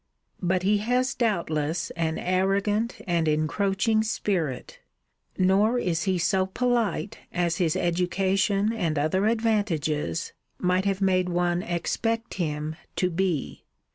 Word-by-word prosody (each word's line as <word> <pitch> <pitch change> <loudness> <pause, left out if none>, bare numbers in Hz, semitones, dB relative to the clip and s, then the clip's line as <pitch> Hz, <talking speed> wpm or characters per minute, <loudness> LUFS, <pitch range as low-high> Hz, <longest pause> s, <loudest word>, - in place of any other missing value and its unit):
But 180 0 +1
he 205 +2 +3
has 250 +3 +1
doubtless 170 -8 -1
an 160 -2 -1
arrogant 195 +5 0
and 170 -3 +1
encroaching 195 +8 +1
spirit. 180 - -2 0.6
Nor 200 +6 +3
is 170 -8 -1
he 190 -1 +1
so 185 +2 +1
polite 235 -1 -1
as 175 -1 0
his 165 -4 +1
education, 195 +4 +1
and 170 -9 -1
other 175 +8 +1
advantages, 205 -9 0 0.2
might 180 +1 +1
have 195 -1 0
made 185 -1 +2
one 175 0 +1
expect 225 +7 -2
him 155 -2 -3 0.2
to 180 -1 +1
be. 175 -4 -2
185 Hz, 120 wpm, -26 LUFS, 170-205 Hz, 0.6 s, he